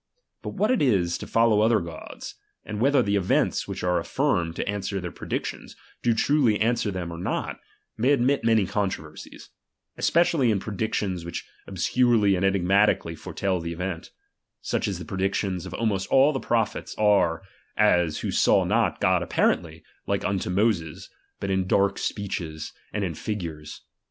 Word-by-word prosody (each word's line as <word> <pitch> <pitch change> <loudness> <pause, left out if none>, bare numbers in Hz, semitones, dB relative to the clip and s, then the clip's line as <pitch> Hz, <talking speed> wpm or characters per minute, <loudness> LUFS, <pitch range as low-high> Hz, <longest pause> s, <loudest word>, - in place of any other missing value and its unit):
But - - -6
Tshat 210 +4 +2
it 255 - +2
is, 95 -10 +2
to - - -7
follow 115 -2 +3
other 110 0 +4
gods, 85 -2 -8 0.3
and 105 -1 -5
whether 135 0 +4
the 100 -1 0
events 95 -3 +1
which - - -5
are 90 -1 +2
affirmed 90 - 0
to - - -3
answer 100 -1 -2
their 90 -2 -5
predic - - -4
tions, - - -7 0.3
do 120 -2 +2
truly 125 -5 +2
answer 115 0 +1
them 90 -3 -4
or 85 - -7
not, 90 - -3 0.4
may 125 +5 +3
admit 140 +1 +2
many 110 -3 +3
controversies; 90 -6 -5 0.5
especially 165 -6 +3
in 105 -3 +2
predictions 100 -3 -2
which 85 +1 -6 0.2
obscurely 105 +2 +2
and 90 - -1
enigmatically 95 -2 +2
foretel 95 +2 -2
the 85 0 -4
event; 90 -1 -5 0.5
such - - -2
as - - -2
the - - -8
predictions 95 -1 -2
of 90 - -8
almost 105 -4 -1
all 135 +3 +5
the 135 - -2
prophets 115 -4 -1
are; 100 -5 +3 0.3
as 90 -7 +3
who - - -2
saw - - +4
not - - +1
God - - +3
apparently, 80 -2 0 0.2
like - - -1
unto 95 -2 -1
Moses, 90 -5 0 0.3
but 100 - -2
in 95 -1 0
dark 100 +1 +2
speeches, 85 -6 -4 0.2
and 105 - -2
in 90 -4 -2
figures. 80 -5 -6
100 Hz, 165 wpm, -25 LUFS, 90-115 Hz, 0.5 s, all